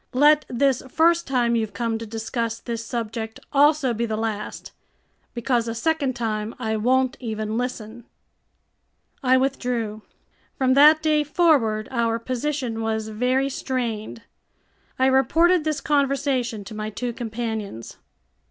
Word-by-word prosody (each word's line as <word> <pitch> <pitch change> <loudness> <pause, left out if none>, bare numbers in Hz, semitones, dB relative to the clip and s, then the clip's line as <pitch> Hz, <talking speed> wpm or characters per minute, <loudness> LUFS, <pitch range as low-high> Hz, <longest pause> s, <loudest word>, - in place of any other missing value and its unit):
Let 295 +3 +5
this 260 +1 +1
first 335 +4 +3
time 240 -3 +1
you've 220 -2 -1
come 230 -2 -1
to 225 - -7
discuss 225 +1 -3
this 230 -1 -5
subject 225 -1 -4
also 290 -2 +4
be 235 +1 -2
the 215 -1 -2
last, 220 -2 -4 0.6
because 235 0 0
a 230 - -3
second 280 0 0
time 220 -2 -3
I 220 -3 -2
won't 255 +4 +1
even 220 -2 -3
listen." 235 -1 -4 1.2
I 260 -1 +4
withdrew. 245 -5 -1 0.6
From 260 -1 +3
that 305 +3 +7
day 305 -1 +3
forward 280 -9 +2
our 230 -2 +1
position 250 -1 -3
was 220 -1 -2
very 250 +5 +1
strained. 235 -5 -4 0.7
I 260 - +3
reported 310 +6 +3
this 310 -2 -1
conversation 275 -6 0
to 200 - -10
my 215 0 -4
two 240 +3 -4
companions. 220 - -5
240 Hz, 135 wpm, -23 LUFS, 225-275 Hz, 1.2 s, that